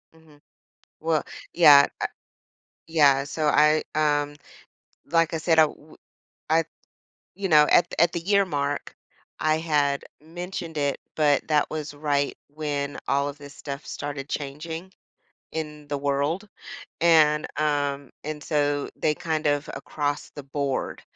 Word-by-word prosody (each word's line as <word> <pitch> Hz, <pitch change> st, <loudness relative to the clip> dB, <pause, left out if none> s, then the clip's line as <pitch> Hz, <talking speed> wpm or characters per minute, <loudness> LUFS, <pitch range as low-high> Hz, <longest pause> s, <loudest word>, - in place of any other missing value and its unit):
Mhm. 155 Hz, -2 st, -21 dB, 0.6 s
Well, 160 Hz, -1 st, +1 dB, 0.3 s
yeah. 145 Hz, -4 st, +8 dB
Eh, -, -, +1 dB, 0.8 s
yeah, 145 Hz, -4 st, +4 dB
so 150 Hz, +1 st, -2 dB
I, 150 Hz, +1 st, +4 dB
um, 145 Hz, -1 st, +1 dB, 0.7 s
like 165 Hz, -1 st, +2 dB
I -, -, 0 dB
said, 160 Hz, 0 st, +3 dB
I -, -, +9 dB
w 155 Hz, 0 st, -5 dB, 0.5 s
I, 165 Hz, +1 st, +4 dB, 0.7 s
you 195 Hz, -1 st, -3 dB
know, 150 Hz, -1 st, +7 dB
at -, -, +5 dB
at 170 Hz, 0 st, +5 dB
the 170 Hz, -, -1 dB
year 200 Hz, +2 st, +3 dB
mark, 145 Hz, -3 st, -3 dB, 0.4 s
I 155 Hz, 0 st, +2 dB
had 145 Hz, -3 st, +1 dB, 0.2 s
mentioned 170 Hz, 0 st, -6 dB
it, 140 Hz, -1 st, 0 dB, 0.2 s
but 145 Hz, -3 st, +3 dB
that 150 Hz, -1 st, +2 dB
was 155 Hz, -2 st, -5 dB
right 145 Hz, -1 st, 0 dB
when 145 Hz, -1 st, -3 dB
all 140 Hz, +1 st, +1 dB
of 145 Hz, -, -9 dB
this 145 Hz, -1 st, -12 dB
stuff 140 Hz, 0 st, -7 dB
started 145 Hz, -1 st, -6 dB
changing 160 Hz, +5 st, -5 dB, 0.6 s
in 150 Hz, -2 st, -6 dB
the 145 Hz, -, -2 dB
world. 145 Hz, +8 st, -1 dB, 0.5 s
And, 155 Hz, -2 st, +5 dB
um, 145 Hz, -2 st, 0 dB
and 150 Hz, 0 st, -5 dB
so 145 Hz, -2 st, 0 dB
they 150 Hz, -, +1 dB
kind 155 Hz, -1 st, -2 dB
of, 145 Hz, 0 st, +1 dB
across 145 Hz, -1 st, -3 dB
the 145 Hz, -, -9 dB
board, 140 Hz, 0 st, -3 dB
150 Hz, 140 wpm, -25 LUFS, 145-160 Hz, 0.8 s, I